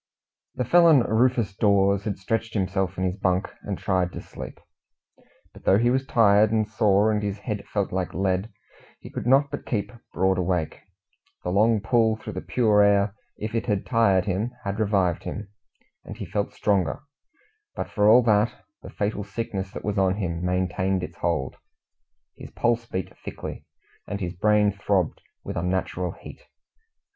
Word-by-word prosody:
The 125 - -1
felon 165 0 +6
Rufus 115 -2 +1
Dawes 100 -1 +3
had 105 -3 -2
stretched 115 +4 -2
himself 95 -2 -1
in 95 - -1
his 95 +1 -1
bunk 95 -1 0
and 100 -2 -4
tried 90 -2 0
to - - -6
sleep. - - -9 0.9
But - - -15
though 95 - +4
he 120 +3 +3
was 130 +1 0
tired 105 -2 +4
and 110 -1 +1
sore, 110 -1 +3
and 105 -1 0
his 100 -1 -3
head 105 -1 -5
felt 100 -2 -2
like 90 -3 -3
lead, 95 +3 0 0.5
he - - -11
could - - -5
not 140 +2 +4
but - - -6
keep 105 -4 -2 0.2
broad 95 +1 +1
awake. 90 -3 -1 0.6
The 90 - -2
long 110 +3 +3
pull 110 0 +2
through 110 - -8
the - - -4
pure 110 -4 +3
air, 100 0 +3 0.2
if 110 +1 -5
it 115 - -2
had 105 -3 0
tired 100 -6 +3
him, 100 +4 -1
had 100 +2 -3
revived 95 -5 +1
him, 105 -1 -6 0.5
and - - -9
he - - -5
felt 100 -1 -2
stronger; 100 +2 0 0.7
but - - -3
for 105 -1 +2
all 120 +3 +7
that, 110 -1 +3 0.3
the - - -10
fatal 105 0 -2
sickness 100 -2 -4
that - - -8
was 105 -1 0
on 95 -1 +2
him 85 -4 -3
maintained 90 +1 0
its - - -7
hold; 75 -7 -2 0.8
his - - -10
pulse 120 0 0
beat 95 -4 -5
thickly, - - -8 0.4
and 100 - -4
his 90 -3 -3
brain 105 +2 +3
throbbed 100 -3 -1 0.2
with - - -6
unnatural 90 0 -2
heat. - - -12
100 Hz, 170 wpm, -25 LUFS, 95-110 Hz, 0.9 s, all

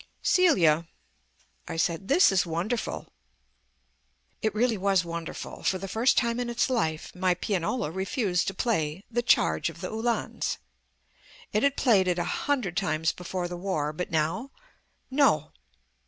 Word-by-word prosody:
"Celia," 170 - +4 0.8
I - - -5
said, 170 +3 0
"this 305 - +5
is 190 -2 +3
wonderful." 175 +8 -3 1.3
It 220 -1 0
really 235 +1 +2
was 195 -2 +2
wonderful. 170 -1 -6
For 190 - +1
the 195 +1 -6
first 225 +7 +2
time 235 -1 +2
in 245 -1 -2
its 240 +2 0
life 160 -11 -1
my 180 0 +1
pianola 180 +1 -1
refused 190 0 -1
to 195 - -2
play 180 -7 -1
"The 240 +1 +1
Charge 240 - +2
of - - -11
the - - -5
Uhlans." 230 +2 -1 1.0
It 210 - +2
had 280 -1 +2
played 205 -8 +4
it 180 -1 +1
a 175 - 0
hundred 200 - -1
times 165 -4 +1
before 180 0 -4
the 175 - -6
War, 165 -5 -2
but 180 +3 -4
now 165 - -1 0.6
no! 260 - +3
190 Hz, 150 wpm, -27 LUFS, 170-235 Hz, 1.3 s, this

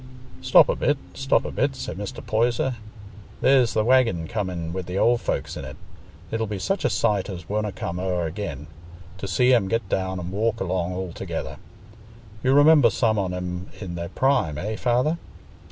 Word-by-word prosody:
"Stop 130 0 +6
a - - 0
bit, 145 - +1 0.2
stop 135 0 +1
a - - -4
bit," 135 0 0
said - - -5
Mr. 100 +1 -6
Poyser. 120 +3 +1 0.7
"There's 130 -3 +4
th' 110 -1 +1
waggin 115 -10 +3
coming 90 -7 -3
wi' 95 - -2
th' 90 +1 -5
old 120 +3 +3
folks - - -2
in't; 65 0 -7 0.5
it'll 115 0 -1
be 105 -1 -4
such 195 - -1
a - - +3
sight 105 -1 +1
as 90 -3 -7
wonna 105 +1 -1
come 85 -1 -5
o'er 90 -2 -1
again, 80 -4 -5 0.5
to 100 - -4
see 125 +7 +3
'em 115 -6 +3
get 115 0 -1
down 95 0 -1
an' 90 +1 -5
walk 110 +3 0
along 90 -1 -1
all 90 -2 -4
together. - - -5 0.8
You 130 - +3
remember 145 -3 +7
some 110 -2 +1
on 95 -2 -1
'em 90 0 -4
i' 105 - -6
their 85 -1 -5
prime, 125 - +1
eh, 105 +7 -3
Father?" 125 +9 +1
105 Hz, 185 wpm, -24 LUFS, 90-120 Hz, 0.8 s, remember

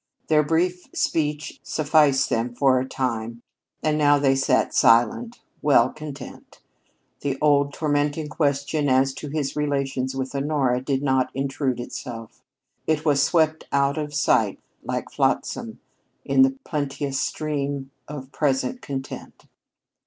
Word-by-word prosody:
Their 155 -1 +5
brief 175 +4 0
speech 150 -1 -1
sufficed 150 -3 +3
them 120 +1 -1
for 130 -1 +4
a 130 +1 -4
time, 115 -2 -3 0.4
and 155 0 +1
now 145 -1 +5
they 135 -1 +3
sat 135 - +2
silent, 120 - +3 0.2
well 130 -4 +4
content. 150 -2 -10 0.6
The 140 -2 -2
old, 145 -1 +3
tormenting 145 0 -1
question 145 0 0
as 130 +1 +3
to 140 +3 -7
his 145 -2 -2
relations 140 -3 -1
with 130 0 -3
Honora 140 -3 0
did 135 +1 -1
not 130 -2 +2
intrude 135 -1 -1
itself. 120 -2 -7 0.5
It 155 0 0
was 145 -2 +3
swept 160 +1 +2
out 140 +1 +2
of 150 -1 -4
sight 150 - +2 0.3
like - - -4
flotsam - - -1 0.5
in - - +3
the 265 0 +4
plenteous 140 -2 -2
stream 140 -3 -3 0.2
of 140 -2 -8
present 150 - 0
content. 135 -1 -7
140 Hz, 130 wpm, -24 LUFS, 135-150 Hz, 0.6 s, Their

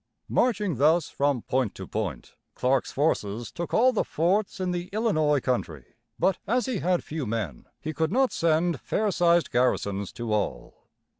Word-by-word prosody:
Marching 205 - +1
thus 155 +4 +3
from 140 -4 0
point 125 -5 0
to 95 - -7
point, 95 - -4 0.2
Clark's 130 +1 +1
forces 120 -7 -1
took 170 0 -5
all 255 +3 +4
the 220 - +1
forts 190 +7 0
in 185 -1 -1
the 175 0 -3
Illinois 155 -10 +2
country; 85 - -3 0.2
but 190 -2 +1
as 245 +3 +1
he 255 -7 -2
had 180 +1 +1
few 150 -4 -4
men, 105 - -4
he 155 - -4
could 160 +3 0
not 260 +3 +2
send 165 -3 +1
fair 210 - 0
sized 170 -1 +3
garrisons 100 -5 0
to 115 -2 -3
all. 65 - -3
155 Hz, 165 wpm, -26 LUFS, 120-185 Hz, 0.2 s, all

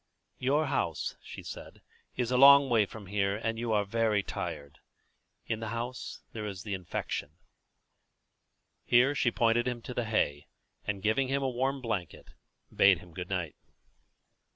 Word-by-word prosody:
"Your 145 +5 +2
house," 130 - -1
she - - -10
said, - - -9 0.3
"is 125 -1 -1
a - - +2
long 140 0 +8
way 110 -4 +4
from 110 0 -10
here, 100 0 0
and 115 0 -2
you 120 -1 -2
are 105 -1 +2
very 110 -1 +1
tired. 70 -6 -6 0.7
In 110 - -2
the 115 - -4
house 120 +3 -5
here 110 - -5
there 105 - -3
is 95 -1 -7
the 105 - -4
infection." 90 -4 -4 1.5
Here 125 +4 +4
she 130 -3 +2
pointed 120 +1 +2
him 125 -1 -2
to 125 - -6
the 120 -1 -1
hay, 90 -10 0 0.4
and, 100 -2 -2
giving 110 +5 +2
him 135 +1 0
a 135 - +1
warm 135 +2 -1
blanket, 105 -8 -4 0.5
bade 95 -2 +6
him 90 0 -14
good 90 +1 -6
night. 90 -5 -2
115 Hz, 165 wpm, -30 LUFS, 100-125 Hz, 1.5 s, long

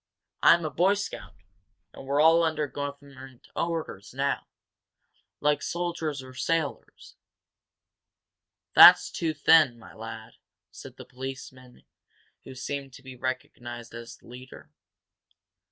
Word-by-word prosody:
I'm 170 -1 +5
a 155 - -3
Boy 185 +7 +2
Scout, 100 - -7 0.6
and 135 - -12
we're 140 +1 0
all 165 +2 +6
under 160 -2 0
government 140 -2 -9
orders 130 - -4
now, 140 +1 -1 0.9
like 150 -1 +1
soldiers 165 -5 -3
or 130 0 -12
sailors." 155 +2 -4 1.6
"That's - - +9
too 160 -2 -2
thin, 155 -4 +5
my 115 - -15
lad," 110 0 -9 0.4
said - - -12
the - - -11
policeman 130 -1 -10 0.6
who 130 - -10
seemed 135 +1 -6
to 130 - -14
be 130 -1 -10
recognized 120 -2 -6
as 115 0 -9
the - - -25
leader. 125 +1 -13
135 Hz, 120 wpm, -27 LUFS, 125-155 Hz, 1.6 s, That's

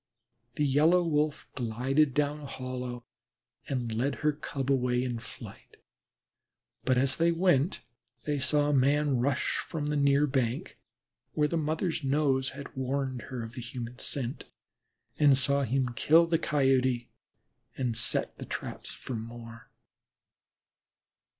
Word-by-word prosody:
The 150 - +1
Yellow 155 +6 +4
Wolf 150 -2 0
glided 130 +4 +1
down 150 0 +1
a 150 - -9
hollow 125 -2 -5 0.6
and 125 -4 -2
led 130 +5 0
her 150 - +5
Cub 140 -2 -3
away 125 -2 +2
in 120 -2 -3
flight, - - -12 1.1
but, 130 -1 +2
as 130 +1 +2
they 170 +1 +3
went, 170 -2 +2 0.4
they 150 -1 -1
saw 145 +2 +2
a - - +2
man 140 0 +3
rush 130 +1 0
from 155 -3 -4
the 145 -1 +3
bank 135 - -8 0.3
near - - -15 0.6
where 150 -1 +2
the 170 - -2
mother's 160 +1 -1
nose 135 -1 +2
had 140 +1 -9
warned 130 -1 -2
her 125 -3 -4
of 115 +1 -8
the 125 - -6
human 120 0 -6
scent. 130 -2 -3 0.7
They 145 -2 +6
saw 140 +2 +2
him 130 0 0
kill 165 +6 +5
the 165 -1 +1
caught 170 - -5
Coyote 130 -2 +2 0.7
and 125 -4 -1
set 115 - 0
the - - -6
traps - - -5
for - - -7
more. 115 0 -9
135 Hz, 145 wpm, -29 LUFS, 125-150 Hz, 1.1 s, They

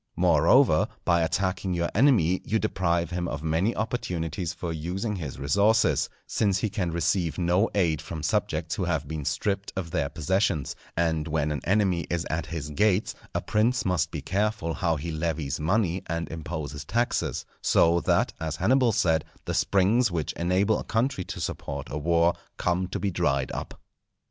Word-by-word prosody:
Moreover, 85 - +4 0.2
by 85 -1 +3
attacking 95 +2 0
your 85 0 -1
enemy 105 - +4
you 110 - 0
deprive 85 -5 0
him 90 0 -2
of 70 -1 -4
many 80 +8 +1
opportunities 90 -7 -2
for 85 -1 -5
using 95 +7 -3
his 75 -7 -6
resources, 100 +11 +2 0.2
since 100 -3 +1
he 105 +1 -1
can 95 -5 -1
receive 85 0 0
no 90 +4 +2
aid 85 -7 +2
from 80 -2 -6
subjects 80 -3 0
who 95 - -1
have 80 -5 -1
been 75 -1 -5
stripped 100 +6 -1
of 90 -4 -4
their 70 - 0
possessions; 80 0 0 0.2
and 80 -2 +1
when 75 -1 0
an 75 -3 -3
enemy 95 -3 +2
is 85 -1 -1
at 80 +1 -2
his 75 -3 -5
gates, 100 +5 +2 0.2
a - - +1
prince 120 +4 +1
must 85 -3 +1
be 75 -5 -6
careful 100 -2 -1
how 85 -3 0
he 80 +3 -4
levies 80 -3 -2
money 90 +2 +1
and 85 0 -2
imposes 80 -3 -5
taxes; 120 - -1 0.2
so 85 +1 +4
that, - - +1
as 80 -1 -3
Hannibal 125 +3 +3
said, 85 -7 +2 0.2
the - - -2
springs 105 +5 +3
which 85 -4 -2
enable 95 +5 +1
a - - -5
country 115 -3 0
to - - -6
support - - -4
a 75 - -2
war 85 +2 +3 0.2
come 90 +1 0
to 90 - -4
be 100 - -1
dried 70 -7 0
up. - - -6
85 Hz, 175 wpm, -26 LUFS, 80-100 Hz, 0.2 s, Moreover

